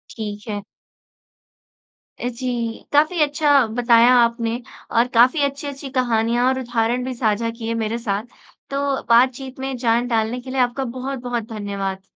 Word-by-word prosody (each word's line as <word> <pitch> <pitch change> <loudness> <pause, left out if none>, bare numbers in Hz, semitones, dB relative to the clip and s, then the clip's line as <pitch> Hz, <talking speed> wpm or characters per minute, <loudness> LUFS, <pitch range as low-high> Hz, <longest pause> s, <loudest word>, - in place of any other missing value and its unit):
ठीक 210 -1 -6
है। 205 -1 -3 1.6
जी, 240 -2 -3
काफ़ी 310 +3 +3
अच्छा 290 -2 +4
बताया 235 +1 +4
आपने 235 0 +1 0.3
और 235 +1 +3
काफ़ी 250 +6 +5
अच्छी-अच्छी 280 0 -4
कहानियाँ 240 -1 +1
और 260 0 +1
उदाहरण 240 0 0
भी 260 - -3
साझा 230 -1 0
किए 230 -1 -3
मेरे 220 +2 -2
साथ। 210 -3 -2 0.5
तो 275 -1 -1
बातचीत 260 +2 +2
में 265 0 -3
जान 240 0 +1
डालने 225 +1 0
के 260 - -10
लिए 265 - -2
आपका 250 +2 0 0.2
बहुत-बहुत 245 -3 -3
धन्यवाद। 200 -3 -4
240 Hz, 140 wpm, -21 LUFS, 230-260 Hz, 1.6 s, काफ़ी